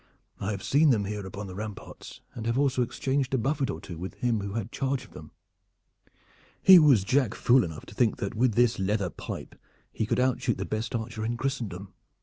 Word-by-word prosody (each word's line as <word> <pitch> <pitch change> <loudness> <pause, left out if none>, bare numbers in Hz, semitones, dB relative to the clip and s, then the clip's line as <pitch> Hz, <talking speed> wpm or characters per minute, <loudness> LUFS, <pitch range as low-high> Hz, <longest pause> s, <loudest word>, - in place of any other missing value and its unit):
"I 95 - -3
have 100 -3 -4
seen 150 +3 +4
them 110 -6 +2
here 100 -1 -4
upon 100 +2 -7
the 95 - -8
ramparts, 105 +1 -8
and 115 -1 -5
have 115 +2 0
also 135 -2 +2
exchanged 135 +2 -1
a - - +2
buffet 135 +3 0
or - - -4
two 85 -3 -9
with 95 +2 -6
him 120 -3 0
who 100 0 -5
had 115 0 -4
charge 135 -1 -2
of - - -20
them. - - -11 1.3
He 190 -2 +9
was 140 - +5
jack 130 +1 +1
fool 125 +1 +4
enough 80 -4 -7
to - - -12
think 115 0 +1
that 100 - -3
with 115 -1 +1
this 120 -2 +3
leather 95 -1 0
pipe - - -7 0.4
he 110 - -2
could - - 0
outshoot 130 -1 +1
the - - -3
best 110 +4 -3
archer 110 -1 -4
in 120 +2 -2
Christendom. 110 -8 -4
115 Hz, 210 wpm, -27 LUFS, 100-130 Hz, 1.3 s, He